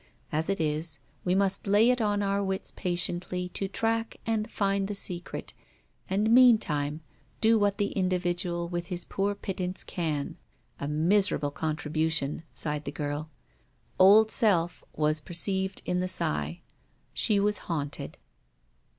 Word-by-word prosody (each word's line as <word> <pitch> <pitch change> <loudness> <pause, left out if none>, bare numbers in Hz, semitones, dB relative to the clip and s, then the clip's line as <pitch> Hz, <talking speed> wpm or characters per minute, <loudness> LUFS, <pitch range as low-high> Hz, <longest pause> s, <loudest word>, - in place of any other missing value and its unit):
As 160 +3 -1
it 195 - 0
is, 155 0 -1 0.3
we 180 0 +1
must 195 0 +1
lay 210 +5 +5
it 250 -1 0
on 205 -1 +1
our 200 0 0
wits 190 0 -2
patiently 180 0 -1
to 195 +2 -3
track 225 +3 -1
and 225 0 -1
find 195 -2 0
the 205 - -4
secret; 180 -3 -5 0.6
and 210 +4 +1
meantime 165 - +4 0.4
do 225 0 +4
what 205 -1 +2
the 205 0 0
individual 175 -2 -1
with 175 0 -4
his 175 -2 -3
poor 200 +1 -1
pittance 185 -2 -2
can. 155 -5 -3 0.4
A 140 - -3
miserable 155 0 +2
contribution! 155 -1 -1
sighed 150 -1 -2
the 140 - -3
girl. 145 +1 -4 0.7
Old 210 +4 +7
Self 175 -6 +2
was 155 0 +1
perceived 190 +4 0
in 180 0 0
the 185 - 0
sigh. 75 - -1 0.5
She 205 -2 +3
was 205 0 +2
haunted. 145 -4 -3
180 Hz, 140 wpm, -28 LUFS, 155-200 Hz, 0.7 s, Old